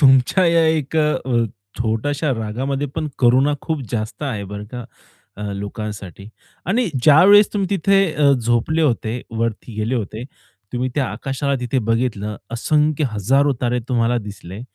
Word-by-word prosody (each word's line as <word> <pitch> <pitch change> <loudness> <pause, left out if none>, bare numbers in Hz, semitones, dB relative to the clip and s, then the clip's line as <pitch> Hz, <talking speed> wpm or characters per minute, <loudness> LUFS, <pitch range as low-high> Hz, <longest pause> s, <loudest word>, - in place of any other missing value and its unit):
तुमच्या 135 +6 +5
या 165 -1 +4
एक 160 -1 0 0.8
छोट्याशा 135 +7 -1
रागामध्ये 130 +6 -2
पण 160 -1 -2
करुणा 130 +4 +4
खूप 160 -3 -3
जास्त 110 +3 -4
आहे 115 -8 -3
बरं 105 +1 -7
का 120 -1 -5 0.7
लोकांसाठी 100 -1 -6 0.4
आणि 225 +4 +1
ज्यावेळेस 195 +7 +7
तुम्ही 200 -3 -1
तिथे 195 +1 +3
अ, 145 -2 +4
झोपले 120 +6 +1
होते, 120 -4 0
वरती 115 0 -3
गेले 110 +4 -1
होते 110 0 -4 0.5
तुम्ही 125 +1 -1
त्या 140 -4 +1
आकाशाला 140 +1 -2
तिथे 125 +1 -1
बघितलं, 110 -3 -1
असंख्य 150 +5 +1
हजारो 135 +8 +2
तारे 125 0 0
तुम्हाला 120 -1 +1
दिसले 100 -2 -9
125 Hz, 135 wpm, -20 LUFS, 110-150 Hz, 0.8 s, ज्यावेळेस